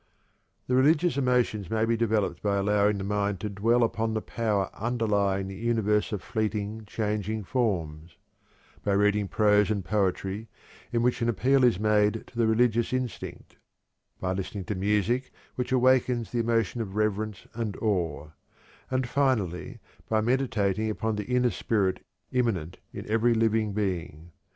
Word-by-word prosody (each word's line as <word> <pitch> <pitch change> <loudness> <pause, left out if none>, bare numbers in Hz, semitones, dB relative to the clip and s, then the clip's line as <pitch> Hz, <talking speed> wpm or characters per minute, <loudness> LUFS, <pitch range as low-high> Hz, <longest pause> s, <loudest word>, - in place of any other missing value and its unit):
'" - - -45
The 125 - 0
religious 155 +6 +4
emotions 125 -7 +1
may 110 0 +1
be 115 +1 +1
developed 110 -6 0
by 100 -1 +1
allowing 105 +1 +2
the 95 - -4
mind 100 -1 -1
to 105 - -2
dwell 115 +5 +2
upon 115 -1 0
the 110 - 0
Power 105 -4 -1
underlying 100 -4 0
the 95 - -6
universe 105 0 0
of 105 -4 -3
fleeting, 110 -1 -2
changing 105 0 -2
forms; 85 - -2 0.7
by 100 - +1
reading 105 0 +2
prose 105 0 +3
and 100 -4 -1
poetry 100 +2 -1 0.4
in 120 -1 +1
which 125 0 +1
an 115 - +2
appeal 130 +5 +3
is 120 -7 +4
made 105 0 +2
to - - -20
the 115 -1 +2
religious 115 +1 +2
instinct; 130 -2 -5 0.6
by 95 0 -1
listening 95 +1 -4
to 105 - -2
music 105 +6 0 0.2
which 125 0 -3
awakens 125 -2 +2
the 120 - -1
emotion 115 -1 0
of 100 -3 -6
reverence 105 0 -1
and 110 -3 -3
awe; 85 -9 -1 0.6
and, 130 -1 0
finally, 120 - 0 0.3
by 110 - +2
meditating 110 -4 0
upon 110 0 -1
the 105 -1 -4
inner 125 -1 +2
spirit 100 -5 0 0.3
immanent 110 -11 -1
in - - -8
every 115 +2 +2
living 110 -1 +2
being. 85 -5 -3
110 Hz, 155 wpm, -27 LUFS, 100-115 Hz, 0.7 s, religious